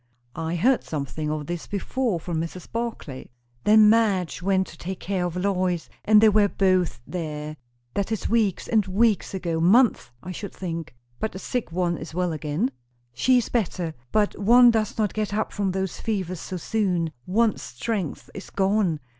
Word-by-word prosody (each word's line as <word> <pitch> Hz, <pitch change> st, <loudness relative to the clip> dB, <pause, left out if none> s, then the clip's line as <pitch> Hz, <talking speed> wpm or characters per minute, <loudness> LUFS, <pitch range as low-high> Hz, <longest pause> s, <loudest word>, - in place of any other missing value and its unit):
"I 165 Hz, +1 st, -2 dB
heard 245 Hz, +9 st, +3 dB
something 150 Hz, +1 st, -4 dB
of 150 Hz, -1 st, -3 dB
this 175 Hz, +1 st, -5 dB
before 205 Hz, 0 st, -1 dB
from 165 Hz, -1 st, -3 dB
Mrs. 170 Hz, +2 st, -7 dB
Barclay." 230 Hz, -, -5 dB, 0.4 s
"Then 215 Hz, 0 st, +7 dB
Madge 210 Hz, -6 st, +2 dB
went 190 Hz, 0 st, +2 dB
to -, -, -13 dB
take 185 Hz, +1 st, -5 dB
care 190 Hz, -2 st, -1 dB
of 175 Hz, -, -6 dB
Lois, 180 Hz, -2 st, 0 dB
and 215 Hz, 0 st, +6 dB
they 220 Hz, -, +7 dB
were 210 Hz, 0 st, +4 dB
both 185 Hz, -8 st, +1 dB
there. 155 Hz, -3 st, -5 dB, 0.4 s
That 200 Hz, +2 st, -2 dB
is 220 Hz, -, -1 dB
weeks 215 Hz, -5 st, +1 dB
and 220 Hz, -2 st, +3 dB
weeks 200 Hz, 0 st, +1 dB
ago, 170 Hz, -3 st, -2 dB
months, 215 Hz, -, +4 dB
I 185 Hz, -, -6 dB
should 200 Hz, +3 st, -6 dB
think." 165 Hz, -7 st, -5 dB, 0.2 s
"But 220 Hz, -, -2 dB
the -, -, -6 dB
sick 235 Hz, +1 st, -3 dB
one 175 Hz, -1 st, 0 dB
is 160 Hz, 0 st, -8 dB
well 180 Hz, -2 st, 0 dB
again?" 150 Hz, -3 st, -1 dB, 0.4 s
"She 255 Hz, -, +3 dB
is 245 Hz, -, 0 dB
better. 180 Hz, -7 st, -1 dB, 0.2 s
But 210 Hz, -1 st, +2 dB
one 240 Hz, +4 st, +7 dB
does 220 Hz, -2 st, -1 dB
not 215 Hz, -3 st, 0 dB
get 210 Hz, -1 st, -2 dB
up 215 Hz, -, -1 dB
from 200 Hz, -2 st, 0 dB
those 190 Hz, -1 st, -3 dB
fevers 185 Hz, -5 st, -2 dB
so 185 Hz, -, -5 dB
soon. 180 Hz, -4 st, 0 dB, 0.2 s
One's 215 Hz, +3 st, +2 dB
strength 145 Hz, -, -4 dB
is 195 Hz, -, -9 dB
gone. 195 Hz, -4 st, +1 dB
190 Hz, 180 wpm, -25 LUFS, 165-215 Hz, 0.4 s, Then